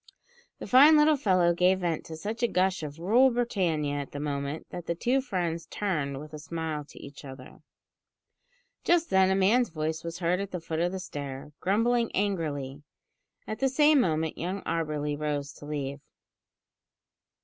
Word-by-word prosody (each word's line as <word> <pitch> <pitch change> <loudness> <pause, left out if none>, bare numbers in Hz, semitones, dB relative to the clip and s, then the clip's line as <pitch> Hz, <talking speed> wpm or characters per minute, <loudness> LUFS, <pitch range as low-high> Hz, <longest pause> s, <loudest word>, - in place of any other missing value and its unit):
The - - -7
fine 290 +5 +7
little 300 +1 +5
fellow 185 -9 +3
gave 185 +2 +2
vent 170 -3 -2
to 160 - -7
such 215 +8 -5
a 240 - +3
gush 190 -3 +1
of 150 -1 -6
"Rule 225 +10 +4
Britannia" 180 - 0
at 140 - -7
the 145 - -5
moment, 145 +1 -3
that 175 -1 -7
the 170 - -1
two 250 +9 +1
friends 175 -9 -3
turned 150 -9 -2
with 155 +1 -10
a 150 - -6
smile 160 -1 -4
to - - -17
each 140 +1 -11
other. 130 -2 -11 1.2
Just 340 -1 +2
then 190 0 +5
a 190 - +2
man's 215 +6 +3
voice 155 0 -3
was 170 0 -5
heard 175 +1 0
at 200 -1 -4
the 180 - -4
foot 160 -1 -4
of 175 +1 +1
the 190 - -4
stair, 140 -3 -7
grumbling 230 +5 +1
angrily. 150 -9 -2 0.6
At 215 - -5
the 270 - +2
same 295 +1 +5
moment 160 -4 -1
young 185 +3 -3
Auberly 150 -3 -2
rose 145 -1 -3
to 145 - -12
leave. 140 -1 -4
170 Hz, 175 wpm, -28 LUFS, 150-205 Hz, 1.2 s, fine